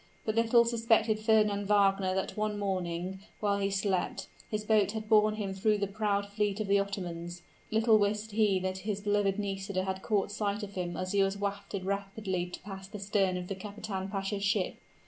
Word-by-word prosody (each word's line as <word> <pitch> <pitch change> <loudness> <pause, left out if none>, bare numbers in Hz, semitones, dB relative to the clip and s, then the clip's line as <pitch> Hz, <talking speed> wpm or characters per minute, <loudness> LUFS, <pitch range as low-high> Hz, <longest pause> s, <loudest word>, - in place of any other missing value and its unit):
But 215 - 0
little 230 +1 +5
suspected 225 -2 +2
Fernand 210 -2 +3
Wagner 195 -2 +3
that 190 - -2
one 215 -1 -1
morning, 185 -2 -2 0.2
while 200 -1 +1
he 195 0 +1
slept, 195 -1 -1 0.2
his 215 -1 -2
boat 210 -2 +3
had 220 -1 -4
borne 215 -1 +5
him 200 -3 -3
through 210 +2 +2
the 200 - 0
proud 200 0 0
fleet 205 0 -1
of 215 - 0
the 200 0 +4
Ottomans 175 -3 -4 0.3
little 220 0 +4
wist 210 +1 0
he 205 -2 +3
that 185 0 -2
his 200 +1 -3
beloved 205 -1 +1
Nisida 195 -2 -2
had 190 0 -3
caught 205 -2 0
sight 205 0 -2
of 200 -1 -7
him 175 -3 -3
as 185 0 -3
he 200 - +3
was 195 0 +1
wafted 200 -1 -3
rapidly 195 -2 -2
past 190 -1 -8
the - - -4
stern 195 -2 +1
of 180 0 -5
the 195 - -3
kapitan 195 -1 -5
pasha's 195 0 -2
ship! 195 -1 +1
200 Hz, 190 wpm, -31 LUFS, 190-210 Hz, 0.3 s, little